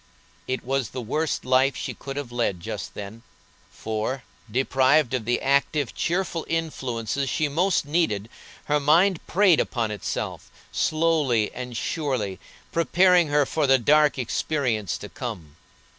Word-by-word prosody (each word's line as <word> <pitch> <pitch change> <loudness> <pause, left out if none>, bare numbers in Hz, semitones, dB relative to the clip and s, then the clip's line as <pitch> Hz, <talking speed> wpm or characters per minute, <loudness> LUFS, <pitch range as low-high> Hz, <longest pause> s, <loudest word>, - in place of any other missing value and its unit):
It 130 -2 -2
was 135 -2 -1
the - - -6
worst 150 +6 -1
life 130 +2 +3
she - - -4
could 135 0 -7
have 140 -4 -5
led 120 -7 -1
just - - -6
then, 105 +3 -8 0.5
for, 110 +4 -3 0.3
deprived 130 +3 +3
of 125 -4 -1
the 120 +1 +1
active, 140 0 +1
cheerful 170 -2 -1
influences 135 -6 -2
she 155 +4 +1
most 170 +4 +1
needed, 145 - 0 0.4
her 150 0 +2
mind 165 +5 +4
preyed 185 -3 +4 0.2
on 115 -2 +1
itself, 105 -3 -4 0.2
slowly 155 -9 +1
and 125 -1 -6
surely, 125 - -2 0.3
preparing 175 +1 +4
her 145 0 +3
for 150 +1 0
the 135 0 +6
dark 150 +4 +4
experience 120 - -1
to - - -8
come. 75 -4 -7
135 Hz, 140 wpm, -25 LUFS, 115-155 Hz, 0.5 s, the